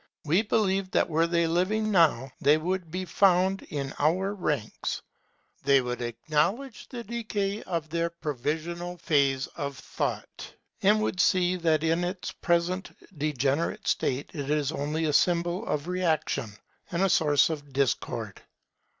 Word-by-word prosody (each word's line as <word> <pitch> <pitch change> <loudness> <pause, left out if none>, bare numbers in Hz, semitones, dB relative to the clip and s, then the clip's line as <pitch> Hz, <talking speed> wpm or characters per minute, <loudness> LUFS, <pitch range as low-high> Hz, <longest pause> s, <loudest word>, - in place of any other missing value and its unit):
We 165 +7 +3
believe 195 -3 +1
that - - +1
were 165 +2 +3
they 170 0 +2
living 195 +6 +1
now, 150 - +3
they 150 +2 +5
would 180 +1 -2
be 185 +3 -3
found 190 +1 +3
in 140 -2 -5
our 185 +7 +2
ranks. 150 - -2 0.6
They 140 0 +5
would 125 -1 -3
acknowledge 155 - -1
the 240 -2 -6
decay 215 -3 -2
of 165 -4 -3
their 170 +1 -1
provisional 170 +3 -3
phase 140 -5 +2
of 140 -4 -4
thought, - - -5 0.3
and 210 +2 +4
would 185 - -2
see 180 0 +3
that 160 -3 +2
in 165 +2 +2
its 180 +1 -3
present 175 +2 -1 0.2
degenerate 150 - -1
state 130 +3 0
it 145 -3 -4
is 150 -1 +1
only 155 +2 -2
a 150 - 0
symbol 175 +5 +2
of 150 +1 -2
reaction, 160 - 0 0.4
and 175 +2 +1
a - - +5
source 155 -1 +4
of 145 -3 -6
discord. 135 -2 -1
170 Hz, 145 wpm, -27 LUFS, 145-185 Hz, 0.6 s, they